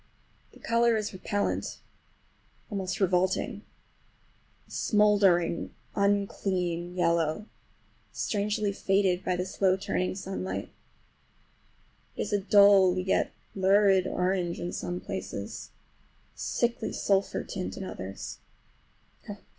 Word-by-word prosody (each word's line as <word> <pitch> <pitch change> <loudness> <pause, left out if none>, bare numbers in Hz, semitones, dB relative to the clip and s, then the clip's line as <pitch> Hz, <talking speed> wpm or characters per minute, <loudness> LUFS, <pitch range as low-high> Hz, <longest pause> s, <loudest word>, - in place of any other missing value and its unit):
The - - -17
color 230 0 +2
is 215 -1 -3
repellant, 200 +2 -2 0.9
almost 190 -2 -3
revolting; 185 -1 +1 1.1
a - - -21
smouldering, 200 -6 +2 0.2
unclean 185 -4 0
yellow, 170 +1 +1 0.7
strangely 210 0 -1
faded 195 -2 +1
by 180 - 0
the 180 +1 -2
slow 190 0 +1
turning 185 -1 -1
sunlight. 190 0 -4 1.4
It - - -3
is - - -4
a 205 - +3
dull 200 -2 +6
yet 185 +1 +1 0.2
lurid 195 -1 +4
orange 180 -2 -1
in 175 - -4
some 175 0 -3
places, 190 - -6 0.7
a - - -20
sickly 240 0 -1
sulphur 195 -1 0
tint 185 -2 -5
in - - -5
others. 95 - -7
190 Hz, 100 wpm, -28 LUFS, 180-200 Hz, 1.4 s, dull